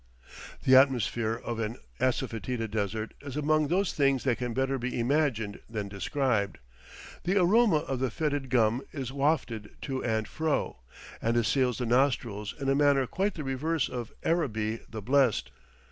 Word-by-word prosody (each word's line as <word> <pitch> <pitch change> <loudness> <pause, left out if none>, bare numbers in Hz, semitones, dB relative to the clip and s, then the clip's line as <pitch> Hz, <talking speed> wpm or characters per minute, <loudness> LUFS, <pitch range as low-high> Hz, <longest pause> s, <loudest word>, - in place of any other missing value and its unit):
The 130 - +6
atmosphere 120 -4 +3
of 115 -1 -3
an 115 +1 -3 0.2
assafoetida 120 -2 -1
desert 110 +1 -2
is 140 -1 -6
among 155 0 +2
those 185 +4 +1
things 135 -3 +2
that 125 -4 +1
can 125 -1 -2
better 135 +2 0
be 125 0 -3
imagined 120 -5 0
than 105 -3 -4
described; 100 0 -1 0.7
the 185 +3 +1
aroma 205 +2 +4
of 135 -2 -2
the 130 0 0
fetid 145 +1 -2
gum 120 -1 +3
is 130 -4 -4
wafted 135 -7 -1
to 135 -2 -3
and 110 -2 0
fro, 155 +2 -1 0.4
and 115 +1 +1
assails 125 +1 +2
the 125 - -2
nostrils 120 -4 +1
in 135 - -3
a 135 - +4
manner 140 -1 +4
quite 195 - -1
the 155 - -5
reverse 140 +3 0
of 120 -2 -5
"Araby 115 -10 0
the 110 -2 -7
blest." 130 -1 +2
130 Hz, 160 wpm, -29 LUFS, 115-145 Hz, 0.7 s, The